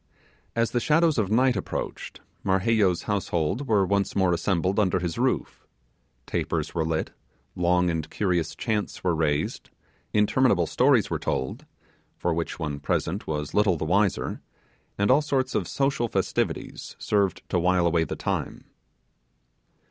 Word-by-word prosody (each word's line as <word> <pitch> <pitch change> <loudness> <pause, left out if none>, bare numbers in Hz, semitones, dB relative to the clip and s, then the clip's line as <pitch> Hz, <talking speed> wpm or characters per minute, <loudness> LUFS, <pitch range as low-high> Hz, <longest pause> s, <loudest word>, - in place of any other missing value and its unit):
As 115 0 +1
the 120 - +1
shadows 155 +2 +3
of 100 -3 0
night 125 +3 +3
approached 95 - -5 0.2
Marheyo's 95 -1 +2
household 100 - -1
were 105 -4 +3
once 100 +1 0
more 95 -2 +3
assembled 95 +2 0
under 95 -3 +2
his 85 -2 -3
roof: - - -1 0.6
tapers - - -2
were 80 - 0
lit, 80 0 -2 0.4
long 90 -1 +2
curious 90 -5 -1
chants 105 -3 -2
were 90 -2 +2
raised, 75 -2 -1 0.4
interminable 105 -3 +3
stories 125 - +3
were - - -1
told 65 - -3 0.5
(for 85 - 0
which 85 0 -3
one 75 -4 -3
present 85 +6 -2
was 75 -2 -3
little 105 -4 +3
the 80 - -3
wiser), 100 +4 +1 0.6
and 100 +4 +3
all 140 +4 +5
sorts 135 -3 -1
of - - -1
social 135 -3 0
festivities - - -2
served 100 -4 0
to - - +1
while 90 0 +2
away 85 -1 +3
the 75 - -4
time. - - -3
95 Hz, 140 wpm, -26 LUFS, 85-110 Hz, 0.6 s, all